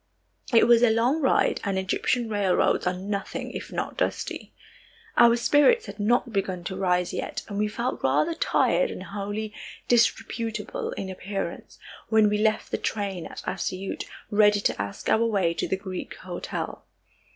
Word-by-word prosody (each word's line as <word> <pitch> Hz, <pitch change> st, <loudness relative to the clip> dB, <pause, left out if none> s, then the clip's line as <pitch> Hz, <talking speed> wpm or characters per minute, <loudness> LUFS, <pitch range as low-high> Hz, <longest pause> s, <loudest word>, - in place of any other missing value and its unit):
It 230 Hz, -, +6 dB
was 235 Hz, -1 st, +6 dB
a 240 Hz, -, +6 dB
long 240 Hz, +8 st, +2 dB
ride 265 Hz, -, +2 dB
and 195 Hz, -1 st, -1 dB
Egyptian 225 Hz, +6 st, 0 dB
railroads 200 Hz, -4 st, +1 dB
are 180 Hz, -, +2 dB
nothing 195 Hz, +1 st, -4 dB
if -, -, -7 dB
not -, -, -4 dB
dusty. -, -, -2 dB, 0.6 s
Our 235 Hz, 0 st, +7 dB
spirits 295 Hz, -, +4 dB
had -, -, -9 dB
not 235 Hz, +2 st, +1 dB
begun 190 Hz, -3 st, -1 dB
to 190 Hz, -, -4 dB
rise 180 Hz, -2 st, +1 dB
yet, -, -, -4 dB
and 205 Hz, -1 st, -4 dB
we 210 Hz, -, +2 dB
felt 235 Hz, +4 st, -3 dB
rather 140 Hz, -, +2 dB
tired -, -, +2 dB
and -, -, -6 dB
wholly 205 Hz, +3 st, -4 dB, 0.3 s
disreputable 225 Hz, -2 st, 0 dB
in 190 Hz, -1 st, -5 dB
appearance, 195 Hz, +1 st, -5 dB, 0.3 s
when 220 Hz, -1 st, +5 dB
we 210 Hz, 0 st, 0 dB
left 215 Hz, 0 st, +1 dB
the -, -, -1 dB
train 195 Hz, -5 st, -3 dB
at -, -, -9 dB
Assiyut, 190 Hz, +1 st, -3 dB, 0.3 s
ready 210 Hz, 0 st, +5 dB
to 95 Hz, -, 0 dB
ask 100 Hz, 0 st, -6 dB
our 225 Hz, -, +3 dB
way 195 Hz, -7 st, +1 dB
to -, -, -2 dB
the 190 Hz, -, -1 dB
Greek 190 Hz, -2 st, -6 dB
hotel. -, -, -5 dB
210 Hz, 165 wpm, -26 LUFS, 190-230 Hz, 0.6 s, Our